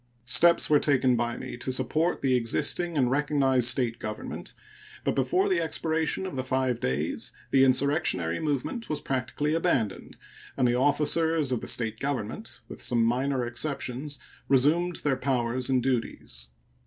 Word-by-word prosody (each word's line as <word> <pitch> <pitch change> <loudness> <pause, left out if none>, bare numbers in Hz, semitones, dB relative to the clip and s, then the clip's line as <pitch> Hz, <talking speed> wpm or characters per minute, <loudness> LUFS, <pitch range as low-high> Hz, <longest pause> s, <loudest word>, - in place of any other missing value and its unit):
Steps 170 +7 +6
were 150 -1 +4
taken 130 -4 +2
by 120 0 -2
me - - -7
to 130 - -4
support 145 +7 0
the 135 -1 +2
existing 150 +7 +1
and 125 -3 +2
recognized 135 -3 +2
State 120 -1 +1
government, 110 0 -7 0.5
but - - 0
before 135 +8 +1
the 180 -3 +1
expiration 160 +2 -1
of 185 - -6
the 130 - -2
five 130 -2 -1
days 70 +5 -2 0.2
the 135 -1 +5
insurrectionary 130 - +1
movement 155 - -3
was 155 -1 -1
practically 135 +2 -2
abandoned, 135 - -1 0.4
and 125 - +3
the 120 - +2
officers 150 +3 +2
of 125 - -1
the - - -7
State 110 -2 -2
government, 140 - -4
with - - -9
some 120 -2 +1
minor 130 +2 0
exceptions, 135 +2 -3 0.3
resumed 155 +7 +2
their 145 -3 +1
powers 125 -1 -1
and 130 -2 +2
duties. 115 - -3
130 Hz, 155 wpm, -27 LUFS, 120-150 Hz, 0.5 s, Steps